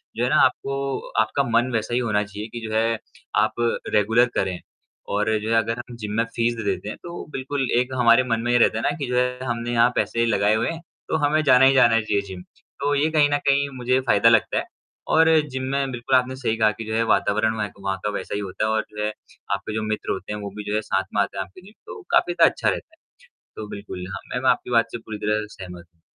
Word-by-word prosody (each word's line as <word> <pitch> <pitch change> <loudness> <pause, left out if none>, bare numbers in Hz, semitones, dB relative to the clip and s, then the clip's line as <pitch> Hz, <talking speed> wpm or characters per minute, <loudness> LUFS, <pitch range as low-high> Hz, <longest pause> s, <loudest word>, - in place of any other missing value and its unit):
जो - - -1
है - - +1
ना - - +2
आपको 135 0 -2 0.2
आपका 110 +6 0
मन 120 +1 +1
वैसा 110 +1 -1
ही 120 - +2
होना 105 -4 +1
चाहिए 105 +1 -7
कि 120 - -4
जो 110 - -5
है 115 0 +1 0.4
आप - - 0 0.4
रेगुलर 110 +3 +4
करें। 95 -2 -1 0.5
और 105 +2 0
जो 110 - -4
है 115 - +2
अगर 115 +1 0
हम 120 0 -8
जिम 105 -2 -5
में 115 - +3
फीस 115 0 +1
दे 115 - -5
देते 100 0 -2
हैं - - -6
तो 175 0 -7
बिल्कुल 135 +1 -3 0.2
एक 125 +1 -2
हमारे 115 +1 +6
मन 115 -3 -1
में 120 +1 -1
ये 120 - +4
रहता 115 -2 +3
है 115 - -3
ना - - +2
कि 140 -3 -4
जो 125 - -2
है 125 0 0
हमने 120 -1 -2
यहाँ 115 +1 +5
पैसे 115 0 +1
लगाए 105 -2 +2
हुए 110 - 0
हैं 165 0 -5 0.3
तो - - 0
हमें 155 +2 +2
जाना 130 -2 +6
ही 135 - +6
जाना 120 -4 +5
चाहिए 105 -1 0
जिम। 95 -2 -8 0.4
तो 145 +1 +1
ये 145 +3 +2
कहीं 150 -2 +4
न 145 - +2
कहीं 140 0 +3
मुझे 130 +1 +1
फ़ायदा 110 0 +5
लगता 115 -2 +3
है। - - -1 0.5
और 160 0 +5 0.2
जिम 130 -1 -4
में 140 -1 0
बिल्कुल 125 +1 0
आपने 130 +1 -1
सही 125 -4 -1
कहा 110 -1 +4
कि 110 +1 -8
जो 110 - -4
है 115 - +2
वातावरण 110 +2 +1
वहे 105 -1 -1
का 100 - -19
वहाँ 95 -1 -1
का - - +1
वैसा - - -5
ही - - -1
होता 100 +1 -3
है 110 - 0
और 110 0 0
जो 105 0 -4
है 105 - 0 0.4
आपके 100 +2 -4
जो 110 - -1
मित्र 110 0 -2
होते 95 +2 -4
हैं 105 - -5
वो 100 - -5
भी 105 - -5
जो - - 0
है 110 - +1
साथ 95 -2 -1
में 105 - +3
आते 100 -1 -3
हैं 95 - -1
आपके 185 - -16
जिम 200 +4 -16
तो 440 - -9
काफ़ी 355 +1 +3
ज़्यादा - - +6
अच्छा - - 0
रहता 315 - -5
है। - - -53 0.6
तो 110 - -7
बिल्कुल 100 -3 -7
हाँ, - - -4 0.2
मैम 125 +1 -1
आपकी - - -3
बात 115 -1 +3
से - - -4
पूरी 110 -2 -8
तरह 105 0 0
सहमत 90 -3 -10
हूँ। 85 - -38
115 Hz, 265 wpm, -23 LUFS, 105-130 Hz, 0.6 s, हमारे